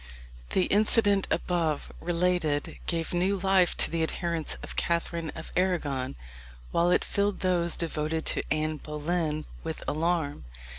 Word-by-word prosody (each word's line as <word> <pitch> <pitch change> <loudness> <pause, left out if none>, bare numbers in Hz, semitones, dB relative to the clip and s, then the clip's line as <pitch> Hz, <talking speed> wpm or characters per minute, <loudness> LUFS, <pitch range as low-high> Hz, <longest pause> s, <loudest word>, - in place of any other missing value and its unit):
The 185 - +4
incident 205 -1 +3
above 165 -4 0
related 170 -4 0
gave 165 -1 -1
new 185 +3 +2
life 190 -1 +3
to - - +1
the 165 0 0
adherents 165 0 -1
of - - -7
Catherine 170 -1 -1
of 160 - -8
Arragon, 150 - 0 0.6
while 170 +1 +3
it 180 - +3
filled 200 0 0
those 175 -3 +2
devoted 160 -1 -2
to - - +1
Anne 155 0 0
Boleyn 155 +1 -2 0.2
with 160 -1 -4
alarm. 155 - 0
170 Hz, 135 wpm, -28 LUFS, 155-180 Hz, 0.6 s, The